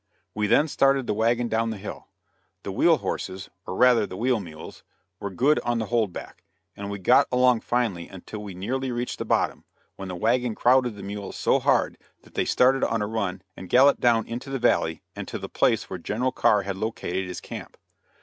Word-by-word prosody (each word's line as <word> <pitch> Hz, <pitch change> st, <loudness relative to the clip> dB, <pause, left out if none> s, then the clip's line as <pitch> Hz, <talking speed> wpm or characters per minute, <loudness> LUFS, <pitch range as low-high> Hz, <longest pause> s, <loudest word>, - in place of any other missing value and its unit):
We 105 Hz, 0 st, 0 dB
then 150 Hz, +8 st, +4 dB
started 135 Hz, -2 st, +2 dB
the 105 Hz, -, 0 dB
wagon 115 Hz, +3 st, +1 dB
down 115 Hz, 0 st, 0 dB
the 110 Hz, -, -4 dB
hill. 100 Hz, +1 st, -8 dB, 0.6 s
The -, -, -4 dB
wheel -, -, +4 dB
horses 95 Hz, 0 st, -5 dB, 0.2 s
or -, -, -4 dB
rather 125 Hz, -2 st, +4 dB
the 95 Hz, -, -8 dB
wheel 125 Hz, +1 st, +1 dB
mules 80 Hz, -5 st, -10 dB, 0.4 s
were 100 Hz, -, -4 dB
good 135 Hz, -, +2 dB
on 120 Hz, 0 st, -1 dB
the 110 Hz, -, -1 dB
hold 110 Hz, -5 st, +2 dB
back, -, -, -9 dB, 0.3 s
and 100 Hz, 0 st, -6 dB
we 100 Hz, -, -4 dB
got 95 Hz, -, +4 dB
along 125 Hz, -1 st, +4 dB
finely 115 Hz, -9 st, -1 dB
until 100 Hz, +3 st, -9 dB
we 100 Hz, -3 st, -8 dB
nearly 130 Hz, +8 st, -2 dB
reached 120 Hz, 0 st, -3 dB
the -, -, -3 dB
bottom, -, -, 0 dB, 0.3 s
when 95 Hz, -, -6 dB
the 90 Hz, -, -5 dB
wagon 115 Hz, +4 st, +1 dB
crowded 125 Hz, -2 st, +3 dB
the 100 Hz, -, -9 dB
mules 100 Hz, 0 st, -6 dB
so -, -, +2 dB
hard -, -, +1 dB, 0.2 s
that -, -, -20 dB
they -, -, 0 dB
started 130 Hz, +1 st, +3 dB
on 115 Hz, -2 st, +1 dB
a -, -, 0 dB
run 100 Hz, -4 st, -3 dB
and 95 Hz, -, -10 dB
galloped 140 Hz, +3 st, +5 dB
down 115 Hz, -2 st, +3 dB
into 120 Hz, +4 st, -6 dB
the 135 Hz, -, -2 dB
valley 80 Hz, -9 st, +1 dB
and -, -, -6 dB
to -, -, -4 dB
the -, -, -6 dB
place -, -, +1 dB
where 95 Hz, -, -6 dB
General 120 Hz, +9 st, -1 dB
Carr 105 Hz, -4 st, +3 dB
had 95 Hz, -1 st, -4 dB
located 95 Hz, -3 st, -3 dB
his 90 Hz, -, -6 dB
camp. -, -, -9 dB
110 Hz, 210 wpm, -25 LUFS, 95-125 Hz, 0.6 s, galloped